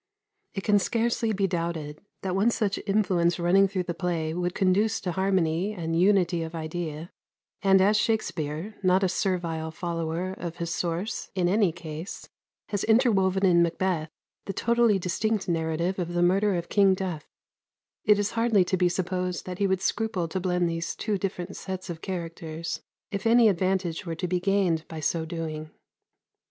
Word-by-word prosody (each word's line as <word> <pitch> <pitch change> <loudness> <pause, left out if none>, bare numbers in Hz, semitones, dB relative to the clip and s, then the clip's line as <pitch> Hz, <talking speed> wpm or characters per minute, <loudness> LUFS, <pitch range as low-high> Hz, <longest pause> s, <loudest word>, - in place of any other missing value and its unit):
It 195 - -3
can 205 -1 +4
scarcely 230 +2 0
be 200 -1 +1
doubted 165 -4 -3 0.2
that 185 -1 -1
one 200 +4 +3
such 215 -3 0
influence 185 -4 +2
running 185 +3 +4
through 190 -1 -2
the 175 -1 -3
play 170 -3 -2
would 175 +1 -2
conduce 200 +3 +2
to 180 - -2
harmony 190 0 +1
and 165 -4 -3
unity 180 -1 +3
of 165 +1 -5
idea; 160 0 -5 0.5
and 195 -1 +5
as 205 +3 +4
Shakspere, 195 -4 -1
not 185 0 +3
a - - +4
servile 170 -4 -1
follower 170 +1 -3
of 170 -3 -6
his 170 0 -3
source 175 +5 -3
in 180 -2 +2
any 195 -1 +3
case, 160 +1 -7 0.4
has 205 -2 -1
interwoven 200 -5 +3
in 175 -2 +5
"Macbeth" 170 -1 0 0.4
the 195 - -4
totally 235 -1 +3
distinct 200 +4 -1
narrative 170 +2 -1
of 175 -1 -3
the 175 0 +2
murder 195 +3 +3
of 170 0 -3
King 195 -2 +4
Duffe, 180 -5 -5 0.7
it 210 -1 +5
is 205 0 0
hardly 230 -5 +3
to 185 - 0
be 180 0 +3
supposed 180 0 -2
that 180 -1 -6
he 200 - +3
would 190 -1 0
scruple 220 -7 0
to 190 - -2
blend 180 -1 +1
these 165 0 -3
two 210 -3 -2
different 190 -1 -4
sets 190 -1 -5
of 165 -1 -8
characters 165 -3 -5 0.3
if 200 +2 -2
any 230 0 +6
advantage 185 -2 0
were 165 - -2
to 180 +3 -3
be 180 +1 0
gained 185 -4 +1
by 160 - -7
so 160 +2 -1
doing. 160 -2 -5
180 Hz, 170 wpm, -27 LUFS, 170-195 Hz, 0.7 s, any